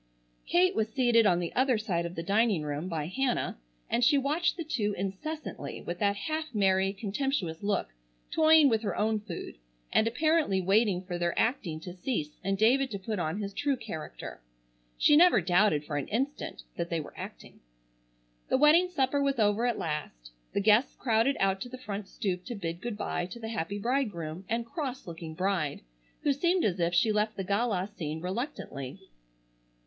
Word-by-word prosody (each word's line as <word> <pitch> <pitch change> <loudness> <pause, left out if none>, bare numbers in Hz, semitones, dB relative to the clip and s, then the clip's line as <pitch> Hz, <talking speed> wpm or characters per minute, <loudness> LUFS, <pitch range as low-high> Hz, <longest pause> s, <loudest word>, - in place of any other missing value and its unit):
Kate 365 +2 +4
was 220 - 0
seated 235 -2 +4
on 175 -3 +4
the 175 -1 -3
other 260 -2 +3
side 175 -6 -1
of 170 - -9
the 165 - -4
dining 200 -2 +2
room, 150 +3 -3
by 160 -4 -2
Hannah, 245 - -1 0.3
and 240 - +1
she 285 +4 +5
watched 300 +7 +1
the 335 - -3
two 215 -9 -1
incessantly 200 - -5
with 175 0 -5
that 200 -1 +2
half 310 +3 -4
merry 195 -1 +3
contemptuous 200 - -2
look, 200 - -1 0.4
toying 315 -1 +6
with 225 -4 +2
her 200 -5 -2
own 215 +1 +1
food, 175 - -8 0.3
and 220 - +4
apparently 300 -4 +2
waiting 195 0 +2
for 180 -2 -4
their 175 0 -1
acting 200 - 0
to 180 +1 -7
cease 180 - -2
and 195 +1 0
David 260 +6 +4
to 200 - -4
put 200 +1 -4
on 160 +2 -1
his 200 -1 -4
true 285 +4 0
character. 165 - -7 0.6
She 295 - +5
never 350 -4 +7
doubted 175 -3 +3
for 145 - -3
an 140 - -3
instant 270 +7 -3
that 170 0 -2
they 165 - 0
were 150 - -8
acting. - - -9 0.9
The - - +3
wedding 315 +6 +6
supper 285 -4 +1
was 275 -1 +1
over 215 +2 +2
at 240 - 0
last. 135 - -5 0.2
The 200 - +1
guests 215 +5 +4
crowded 235 +3 +2
out 195 0 +1
to 245 - -5
the 255 - -7
front 205 -4 -5
stoop 180 -3 -3
to 240 - -5
bid 170 -3 -4
good 235 -3 -4
bye 175 -4 -2
to 235 - -9
the 225 -1 -5
happy 200 -2 -3
bridegroom 200 - -2
and 230 +1 0
cross 265 0 -5
looking 165 -2 -7
bride, 180 -5 -1 0.4
who 285 - +3
seemed 345 +5 +2
as 185 -3 0
if 170 +1 +1
she 215 +5 +4
left 210 +1 0
the 195 - -2
gala 200 -1 0
scene 160 -7 -5
reluctantly. 180 - -5
205 Hz, 185 wpm, -29 LUFS, 175-255 Hz, 0.9 s, never